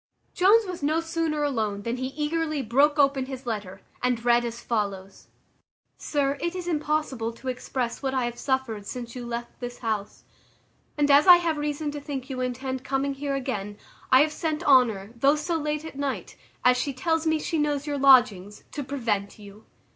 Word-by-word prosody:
Jones 420 +5 +5
was 360 -3 -6
no 310 +3 +1
sooner 325 -2 -1
alone 215 -8 -1
than 235 +3 -2
he 260 +1 -2
eagerly 305 +1 -2
broke 280 +6 +3
open 275 -2 +3
his 265 -1 -7
letter, 205 -5 -5 0.2
and 245 -2 0
read 240 0 +4
as 235 0 -5
follows: 200 -5 -3 0.7
"Sir, 280 -1 -1
it 345 +1 -2
is 360 -1 -5
impossible 300 -7 -1
to 260 +3 -6
express 250 -1 -3
what 270 -1 -1
I 255 -2 +1
have 240 0 -5
suffered 260 -7 -2
since 240 -1 -6
you 245 -1 -6
left 235 0 -6
this 245 -1 -6
house; 215 -3 -4 0.7
and 290 -1 +3
as 285 +4 +6
I 360 - +12
have 335 -3 -1
reason 295 0 -2
to 290 0 -6
think 275 -2 -6
you 255 -1 -3
intend 260 +1 -3
coming 275 +1 -1
here 275 0 -3
again, 210 -7 -4 0.3
I 260 +1 +8
have 305 +1 +1
sent 315 +1 -2
Honour, 230 -7 +3
though 275 +4 +4
so 305 +3 -2
late 300 0 -2
at 280 -3 -8
night, 280 -2 -3 0.3
as 250 0 +6
she 280 +2 -2
tells 325 +4 0
me 315 0 +3
she 320 +1 -2
knows 295 -1 0
your 290 -2 -2
lodgings, 245 -8 +4
to 290 - -4
prevent 230 -7 -2
you. 205 0 -14
270 Hz, 190 wpm, -26 LUFS, 235-300 Hz, 0.7 s, I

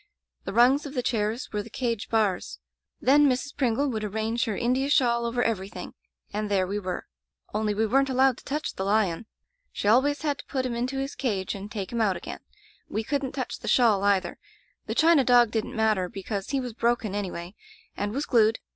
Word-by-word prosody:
The - - -3
rungs 260 +6 +4
of 285 - -9
tfie 250 - 0
chairs 225 0 -1
were 210 - 0
the 220 - -11
cage 230 -2 -2
bars. 210 -5 0 0.4
Then 285 +2 +5
Mrs. 260 +3 -2
Pringle 270 +1 +1
would 220 -2 -3
arrange 220 +3 -1
her 220 -4 -2
India 255 +3 +1
shawl 235 -4 +3
over 245 +1 0
everything, 200 -2 -3 0.4
and 210 0 -2
there 195 -2 +2
we 200 +3 -2
were. 185 -3 -4 0.5
Only 210 0 0
we 220 +2 +2
weren't 270 +5 +2
allowed 260 -1 +3
to - - -17
touch 300 +2 -3
the 190 - -4
lion. 200 -1 +1 0.4
She - - -3
always 275 +7 +3
had 290 -2 -1
to - - -9
put 260 -2 -2
him 250 - -2
into 250 +3 -2
his 270 +1 -3
cage 200 -8 -2
and 200 +1 -7
take 195 -4 -5
him 235 -1 -1
out 195 -5 +2
again. 175 - -7 0.5
We 220 - -2
couldn't 275 +1 -2
touch 260 -2 -4
the - - -8
shawl, 220 -6 +4
either. 195 -3 +1 0.5
The - - -3
china 320 -3 +5
dog 245 -3 +5
didn't 220 -1 -2
matter, 215 -5 +1
because 195 +1 -5
he 275 - 0
was 250 -3 -5
broken, 235 -3 0
anyway, 185 -3 -4 0.4
and 205 0 -2
was 275 +6 -2
glued. 225 -3 +3
230 Hz, 205 wpm, -26 LUFS, 205-260 Hz, 0.5 s, Then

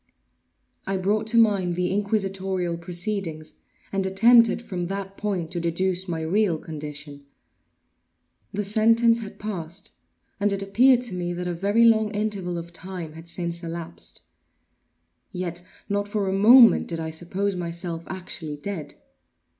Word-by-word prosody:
I 195 0 0
brought 210 +4 0
to 230 - +1
mind 200 -6 +3
the 180 0 0
inquisitorial 195 -3 -1
proceedings, 170 -2 -4 0.3
and 195 0 +1
attempted 230 +5 +5
from 180 -5 -4
that 195 0 -5
point 190 -6 -3
to 175 - -2
deduce 180 +2 -1
my 165 -2 -3
real 180 +1 +1
condition. 145 -2 -8 1.2
The 210 - -2
sentence 230 +3 +4
had 215 -3 -8
passed; 195 -1 -6 0.5
and 205 0 +2
it 195 0 -1
appeared 245 +6 +4
to 240 -6 -3
me 175 -1 -2
that 180 +1 -4
a 175 - -2
very 200 +7 +3
long 220 -2 +4
interval 200 -4 -2
of 170 0 -7
time 180 -4 -7
had 165 +1 -11
since 170 0 -4
elapsed. 170 0 -6 1.1
Yet 175 -2 -3 0.3
not 205 0 -1
for 205 -1 -1
a 190 - 0
moment 225 +2 +7
did 165 -1 -3
I 160 0 -3
suppose 185 +5 -2
myself 170 -1 -4
actually 175 -5 -5
dead. 165 0 -5
190 Hz, 145 wpm, -25 LUFS, 170-205 Hz, 1.2 s, moment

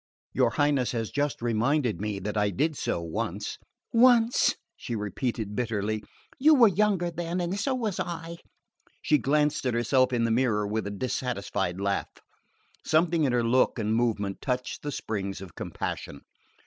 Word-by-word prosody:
"Your 130 -3 +3
Highness 145 -2 +1
has 115 -2 -2
just 145 -4 -1
reminded 120 +1 +1
me 105 -1 -2
that 105 +2 -4
I 105 -1 +2
did 150 - 0
so 85 - -2
once 80 -1 -4 0.2
" - - -57
"Once!" 240 0 +5 0.2
she 120 - -5
repeated 105 0 -3
bitterly. 110 -2 -1 0.4
"You 305 +3 +6
were 235 -5 +7
younger 190 -2 +1
then 170 +1 -3
and 180 +3 -2
so 270 +3 0
was 220 -7 -2
I!" 170 -2 -4 0.7
She 150 - +3
glanced 150 +2 +1
at 120 - 0
herself 130 +2 +3
in 120 -2 +1
the 115 - +1
mirror 115 -3 +2
with 105 0 -2
a - - -2
dissatisfied 100 -5 -2
laugh. 100 0 -1 0.7
Something 160 0 +2
in 130 - +1
her 120 -1 +2
look 125 +3 +3
and 110 -1 0
movement 110 -4 0
touched 125 -2 -2
the 145 - -4
springs 100 -6 -4
of 95 -3 -10
compassion. 70 - -5
125 Hz, 165 wpm, -27 LUFS, 105-160 Hz, 0.7 s, were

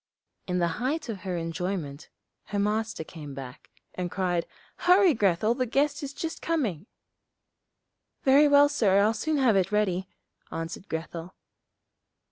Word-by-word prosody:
In 180 -1 0
the 175 -1 +2
height 280 +2 -1
of 210 -4 -4
her 185 -2 -3
enjoyment, 165 -3 -4 0.4
her 205 - -4
Master 215 -2 -1
came 150 -4 -9
back, 130 -2 -9 0.2
and 180 -1 -3
cried, 175 -3 -1 0.3
'Hurry, 365 -1 +5
Grethel, 210 0 +2
the 255 0 -1
guest 285 +4 +1
is 280 -2 -5
just 320 +3 -5
coming.' 225 - -1 1.4
'Very 280 +3 +6
well, 285 0 +7
sir, 220 -10 +2
I'll 210 +2 +4
soon 305 +8 -1
have 255 -6 +4
it 190 -1 +2
ready,' 190 -3 0 0.4
answered 165 +4 -6
Grethel. 165 +2 -5
200 Hz, 140 wpm, -27 LUFS, 175-270 Hz, 1.4 s, well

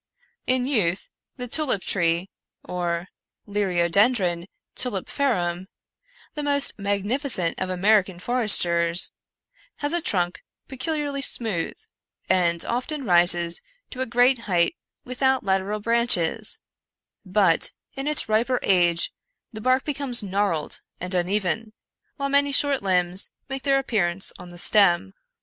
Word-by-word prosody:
In 255 -1 +1
youth, 200 -9 -1 0.3
the 250 -1 -6
tulip 255 -7 0
tree, 170 0 0 0.3
or 175 0 -3 0.4
Liriodendron 185 -1 +1 0.3
tulipiferum, 190 -5 -2 0.7
the 300 - -5
most 285 -1 +2
magnificent 200 - +1
of 185 - -3
American 190 0 +2
foresters, 175 -6 +3 0.6
has 290 +2 -2
a 345 - 0
trunk 180 - -1 0.3
peculiarly 285 +1 -3
smooth, 220 -10 -1 0.5
and 170 -2 +1
often 260 +4 -3
rises 175 -2 +4 0.3
to 255 - -6
a 260 - -2
great 245 +2 +3
height 175 - +2 0.3
without 265 +1 0
lateral 195 +2 -1
branches; 225 -3 +1 0.7
but, 185 -3 +2 0.3
in 270 +1 -4
its 300 -5 0
riper 235 +4 +1
age, 175 -3 +2 0.4
the 220 - -7
bark 255 +3 +1
becomes 275 -6 +2
gnarled 195 -5 -2 0.2
and 180 +1 -5
uneven, 200 +4 -1 0.4
while 275 -1 -3
many 280 0 +2
short 280 -1 +1
limbs 180 -1 +1 0.2
make 270 0 -5
their 275 0 +2
appearance 195 -8 0
on 180 - -11
the 175 - -12
stem. 175 - +4
205 Hz, 120 wpm, -24 LUFS, 175-255 Hz, 0.7 s, rises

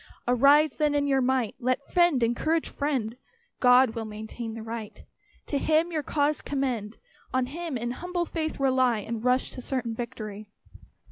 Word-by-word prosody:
Arise 280 +4 +5
then 300 -2 +2
in 285 0 +2
your 270 -1 +2
might! 255 -3 +1
Let 255 +2 0
friend 345 -8 +3
encourage 310 +8 +1
friend; 260 -6 -2 0.4
God 250 -1 +6
will 225 0 -4
maintain 220 +2 -6
the 225 - -7
right; 225 -1 -7 0.4
To 285 - -1
Him 320 +4 +2
your 315 -2 -1
cause 295 +1 0
commend. 250 -7 -2 0.4
On 260 -1 +2
Him 315 +1 -4
in 240 +1 -3
humble 350 +6 -3
faith 315 -3 -3
rely, 260 -3 +3
And 225 +2 -5
rush 250 +1 +2
to 255 - -8
certain 245 -3 -2
victory. 215 -3 -6
255 Hz, 160 wpm, -27 LUFS, 230-290 Hz, 0.4 s, God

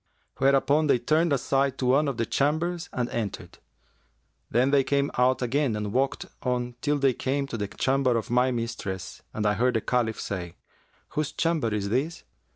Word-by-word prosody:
Whereupon 140 +3 +3
they 140 - +4
turned 155 +7 +2
aside 135 -1 +1
to 130 - -2
one 140 +4 +3
of 135 -4 -2
the 115 - 0
chambers 165 +7 0
and 120 -1 -1
entered. 110 -4 -5 0.9
Then 125 +4 +2
they 140 -1 +4
came 140 +1 +1
out 130 +1 +2
again 130 -1 +1
and 105 -1 -3
walked 135 +2 0 0.2
on 125 -1 -1
till 145 0 +1
they 135 -2 +3
came 140 +3 -1
to 135 - -6
the 105 -3 -2
chamber 130 +2 +1
of 115 - -4
my 125 +1 +3
mistress 115 -6 -4
and 110 - -3
I 105 - +3
heard 125 +4 +1
the 110 - +2
Caliph 115 -2 0
say, 90 -4 -5 0.5
'Whose 150 -1 -2
chamber 160 -9 0
is 100 -1 -1
this?' 145 +9 -1
130 Hz, 180 wpm, -26 LUFS, 115-140 Hz, 0.9 s, they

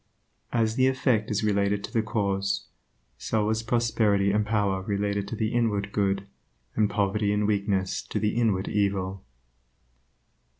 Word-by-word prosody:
As 115 -1 +1
the 130 0 +4
effect 130 -5 +1
is 105 0 0
related 100 -1 +1
to - - -7
the 115 - +3
cause, 100 -3 -1 0.5
so 110 -1 0
is 110 0 0
prosperity 110 -4 +2
and 105 +1 +2
power 105 -3 0
related 100 0 -1
to - - -4
the 110 +1 -1
inward 105 -4 0
good 100 -1 0 0.5
and 105 -1 +2
poverty 100 0 +1
and 105 0 +1
weakness 100 -2 0
to - - -3
the 105 0 0
inward 105 -5 +1
evil. 100 -2 -1
105 Hz, 145 wpm, -26 LUFS, 100-110 Hz, 0.5 s, the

